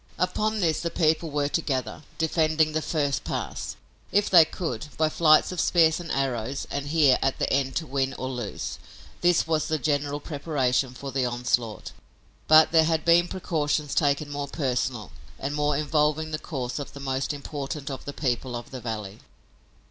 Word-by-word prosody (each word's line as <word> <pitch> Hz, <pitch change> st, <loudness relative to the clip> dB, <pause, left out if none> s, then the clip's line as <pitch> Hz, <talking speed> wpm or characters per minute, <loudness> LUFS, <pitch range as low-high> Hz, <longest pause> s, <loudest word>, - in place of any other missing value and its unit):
Upon 210 Hz, +4 st, 0 dB
this 160 Hz, -3 st, +1 dB
the 170 Hz, -, -1 dB
people 160 Hz, -1 st, +1 dB
were 145 Hz, -1 st, 0 dB
to 165 Hz, -, 0 dB
gather, 130 Hz, -7 st, -3 dB, 0.2 s
defending 160 Hz, -1 st, +2 dB
the 155 Hz, +1 st, -1 dB
first 145 Hz, -4 st, -1 dB
pass, -, -, -4 dB, 0.4 s
if 205 Hz, +1 st, +2 dB
they 170 Hz, -4 st, +9 dB
could, 150 Hz, -7 st, -4 dB
by 155 Hz, 0 st, +2 dB
flights 155 Hz, +1 st, +4 dB
of 180 Hz, -, -5 dB
spears 160 Hz, -2 st, +4 dB
and 170 Hz, -2 st, -6 dB
arrows 135 Hz, -1 st, -2 dB
and 140 Hz, 0 st, -3 dB
here, 145 Hz, -4 st, +4 dB
at 135 Hz, 0 st, 0 dB
the -, -, 0 dB
end, 135 Hz, -1 st, 0 dB
to 165 Hz, -, -1 dB
win 135 Hz, -1 st, -1 dB
or 130 Hz, -, -4 dB
lose. 125 Hz, -6 st, -5 dB, 0.4 s
This 175 Hz, -1 st, +3 dB
was 155 Hz, -1 st, 0 dB
the 155 Hz, -, 0 dB
general 145 Hz, 0 st, -1 dB
preparation 140 Hz, -4 st, -1 dB
for 135 Hz, +1 st, -6 dB
the 130 Hz, -1 st, 0 dB
onslaught, 120 Hz, -2 st, -1 dB, 0.6 s
but 155 Hz, 0 st, +7 dB
there 160 Hz, -1 st, +5 dB
had 160 Hz, -1 st, 0 dB
been 170 Hz, +1 st, +5 dB
precautions 150 Hz, -5 st, -1 dB
taken 145 Hz, 0 st, +1 dB
more 145 Hz, 0 st, -3 dB
personal 125 Hz, -, -2 dB, 0.3 s
and 140 Hz, +2 st, -3 dB
more 150 Hz, -1 st, +1 dB
involving 150 Hz, +1 st, +1 dB
the 155 Hz, -, -2 dB
course 130 Hz, -5 st, -4 dB
of 145 Hz, -, -7 dB
the 140 Hz, -, -9 dB
most 135 Hz, 0 st, -2 dB
important 145 Hz, 0 st, -5 dB
of 135 Hz, -, -7 dB
the 145 Hz, -, -4 dB
people 125 Hz, -3 st, -2 dB
of 120 Hz, -, -7 dB
the 130 Hz, -2 st, -7 dB
valley. 110 Hz, -3 st, -5 dB
145 Hz, 180 wpm, -26 LUFS, 130-160 Hz, 0.6 s, they